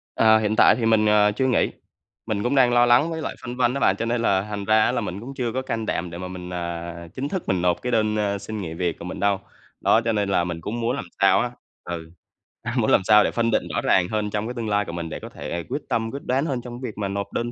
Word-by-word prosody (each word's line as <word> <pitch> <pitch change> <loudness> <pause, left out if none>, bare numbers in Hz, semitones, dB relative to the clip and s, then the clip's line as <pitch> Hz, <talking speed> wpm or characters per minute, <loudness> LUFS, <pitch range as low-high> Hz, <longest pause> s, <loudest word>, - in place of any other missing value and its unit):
Ờ, 110 0 +6
hiện 110 0 0
tại - - +6
thì 120 - -2
mình, 110 -1 +4
ờ, 105 -1 +4
chưa 130 +5 -1
nghỉ. 125 - +2 0.5
Mình 105 -2 -2
cũng 125 +3 0
đang 125 -3 +5
lo 120 0 +5
lắng 120 +7 +4
với 160 -1 -4
lại - - -4
phân 120 +1 -6
vân 125 0 +2
đó 140 - -2
bạn, 95 - +3
cho 115 - -3
nên 120 0 0
là 95 -4 +2
thành 100 -1 -4
ra 110 0 +4
á - - +2
là 120 -1 -1
mình 100 -2 -4
cũng 125 +6 -8
chưa 120 -3 -2
có 130 - -1
can 115 -4 -3
đảm 90 -4 -2
để 85 - -7
mà 90 - -5
mình, 90 -1 -8
à, 85 0 -5
chính 135 +5 -3
thức 190 - -3
mình 95 -2 +1
nộp 90 -1 +1
cái 125 - -2
đơn, 110 -2 +2
ơ, 100 -1 0
xin 110 +1 -6
nghỉ 80 -3 -5
việc 85 -1 -2
của - - -7
mình 90 - -6
đâu. 100 -1 +2 0.4
Đó, 115 - +4
cho 115 - +2
nên 105 -2 0
là 90 -2 +2
mình 85 -1 -4
cũng 115 +7 -4
muốn 120 +3 0
làm 140 - -5 0.2
sao 95 -1 +5
á 120 - -1 0.3
ừ, 80 -2 -6 0.5
a, - - -4
muốn - - +2
làm - - +5
sao 105 +1 +6
để - - 0
phân 115 -1 0
định - - +2
rõ - - +1
ràng 90 -1 +3
hơn 105 -1 -1
trong 105 +1 -2
cái 120 - -4
tương 115 -3 -4
lai 105 0 +1
của - - -6
mình 85 -1 -5
để - - -6
có - - -9
thể 80 +4 -5
quyết 145 - -2
tâm, 115 0 -1
quyết 140 - -7
đoán 135 +4 +1
hơn 130 -5 -2
trong 120 +1 -8
cái 125 - -3
việc - - -24
mà 100 -2 -2
nộp 100 +1 -4
đơn 120 0 -2
110 Hz, 310 wpm, -23 LUFS, 95-120 Hz, 0.5 s, Ờ